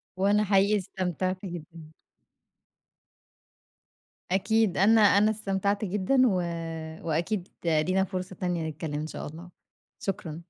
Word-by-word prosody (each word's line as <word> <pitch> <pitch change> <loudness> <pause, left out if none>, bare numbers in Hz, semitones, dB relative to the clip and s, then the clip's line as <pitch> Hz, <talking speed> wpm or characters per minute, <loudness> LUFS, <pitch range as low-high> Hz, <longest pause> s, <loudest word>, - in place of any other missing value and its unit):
وأنا 200 +3 +3
حقيقي 200 +1 +3
استمتعت 185 0 -3
جدًا. 165 -3 -9 2.4
أكيد 215 +1 +2
أنا 220 +4 +5
أنا 205 +1 +5
استمتعت 200 0 -1
جدًا، 210 +7 +1
و 205 - +2 0.7
وأكيد 175 +4 -1 0.2
لينا 170 +4 +2
فرصة 185 -1 -5
تانية 175 -3 -2
نتكلّم 155 0 -6
إن 150 +1 -2
شاء - - -6
الله، 165 +4 -10 0.5
شكرًا. 170 -4 -4
185 Hz, 110 wpm, -27 LUFS, 170-205 Hz, 2.4 s, أنا